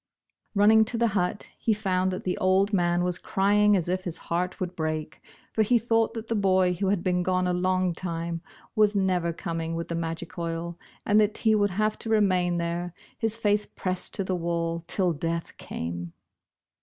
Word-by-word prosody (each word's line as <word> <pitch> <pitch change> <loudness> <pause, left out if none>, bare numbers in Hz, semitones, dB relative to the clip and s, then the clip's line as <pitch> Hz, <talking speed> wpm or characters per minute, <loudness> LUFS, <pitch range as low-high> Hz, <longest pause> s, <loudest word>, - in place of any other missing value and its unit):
Running 215 +2 +6
to 235 +1 -3
the 235 0 +3
hut, 195 0 -1
he 220 - +1
found 190 -3 0
that 185 - -4
the 180 - -1
old 190 +2 +3
man 175 -2 +2
was 180 0 +1
crying 205 +1 +3
as 175 - -1
if 185 +1 -1
his 170 -3 -3
heart 180 +2 -2
would 185 -1 -3
break, 155 -1 -3 0.3
for 220 - +2
he 235 +3 +4
thought 225 0 +1
that 225 0 -5
the 230 - -1
boy, 190 -3 +3
who 190 +3 -2
had 190 -2 +1
been 180 -1 +1
gone 185 0 +1
a 180 - +1
long 185 0 +1
time, 170 -1 -4 0.3
was 215 -1 +4
never 185 -3 +1
coming 165 -1 -4
with 165 0 -4
the 170 - -2
magic 165 +1 -4
oil, 170 0 -4 0.3
and 210 +1 +4
that 210 0 +2
he 220 -1 +3
would 205 -1 +3
have 215 +3 0
to 225 - -5
remain 185 -5 +2
there, 170 +1 -3 0.2
his 225 -1 0
face 210 -2 +1
pressed 185 -1 -2
to 195 - -1
the 185 - -2
wall, 170 -1 -2
till 180 -3 +1
death 165 +2 -3
came. 85 +1 -5
185 Hz, 195 wpm, -27 LUFS, 170-205 Hz, 0.3 s, Running